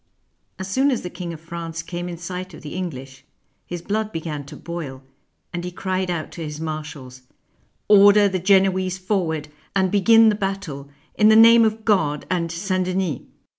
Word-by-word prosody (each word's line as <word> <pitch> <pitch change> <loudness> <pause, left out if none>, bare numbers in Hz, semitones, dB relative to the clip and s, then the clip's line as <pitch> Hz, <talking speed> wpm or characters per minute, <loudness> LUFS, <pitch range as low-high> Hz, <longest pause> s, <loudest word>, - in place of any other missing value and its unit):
As 190 - -6
soon 265 +9 +2
as 255 - -1
the 180 - -6
King 175 -1 -6
of 165 - -8
France 165 0 -6
came 175 +1 -5
in 170 - -6
sight 180 +1 -6
of - - -13
the 150 - -7
English, 135 -8 -6 0.4
his 175 -1 -6
blood 215 +2 -2
began 155 -4 -5
to 150 +2 -11
boil, 150 -5 -7 0.5
and 175 0 -4
he 180 - -4
cried 185 0 -3
out 170 -3 -3
to 170 - -7
his 150 -1 -6
marshals, 150 -5 -6 0.3
" - - -40 0.3
Order 205 0 +7
the 190 -1 -1
Genoese 190 0 +2
forward 175 -6 -2 0.3
and 190 -2 +2
begin 225 +3 +6
the - - +2
battle, 195 -9 -4 0.2
in 215 0 +4
the 220 - +6
name 230 +1 +8
of 220 0 -1
God 155 -9 +1
and 170 -2 -1
St. 185 +2 -1
Denis." 185 -6 -1
180 Hz, 185 wpm, -22 LUFS, 160-195 Hz, 0.5 s, name